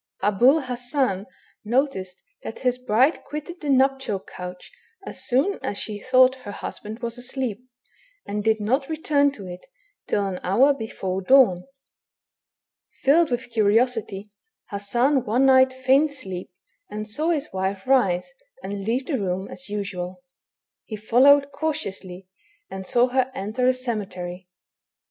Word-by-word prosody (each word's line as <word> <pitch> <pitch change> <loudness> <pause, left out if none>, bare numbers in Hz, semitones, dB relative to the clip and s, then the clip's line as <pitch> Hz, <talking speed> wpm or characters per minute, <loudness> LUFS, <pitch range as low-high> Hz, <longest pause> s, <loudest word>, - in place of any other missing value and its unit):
Ahul 245 +9 +4
Hassan 245 -5 -1 0.4
noticed 215 -6 -1 0.2
that - - -8
his 250 -1 0
hride 255 +9 +3
quitted 305 +4 -7
the 295 - -4
nuptial 265 -6 +2
couch 180 -1 -9 0.3
as - - -6
soon 280 +11 +1
as 200 - -3
she 210 0 -4
thought 255 +3 +4
her 225 -6 -9
hushand 215 +3 -7
was 235 +1 -3
asleep, 250 -3 -3 0.6
and 210 0 -3
did 220 0 +2
not 260 +7 0
return 295 -3 +2
to 200 -7 -10
it, 180 -1 -9 0.4
till 205 -1 0
an 190 -2 -3
hour 250 +10 +4
hefore 195 -7 -4
dawn. 230 -6 +5 1.4
Filled 310 +4 +4
with 245 0 -3
curiosity, 215 -2 +1 0.4
Hassan 240 +7 +1
one 245 +5 +2
night 260 -1 +6
feigned 265 +3 +3
sleep, 190 -10 -6 0.4
and 215 +1 -5
saw 300 +10 -2
his 305 -3 -1
wife 190 +1 -2
rise 250 - +2 0.3
and 200 0 -5
leave 240 +6 -1
the 275 -5 -1
room 190 0 -2
as 265 - -10
usual. 200 +1 -5 0.6
He 220 - -7
followed 275 +6 +4
cautiously, 200 - -4 0.4
and 190 -1 -7
saw 245 +1 +3
her 260 0 +1
enter 220 +4 -1
a 255 - +5
cemetery. 185 -7 -5
240 Hz, 140 wpm, -24 LUFS, 200-270 Hz, 1.4 s, night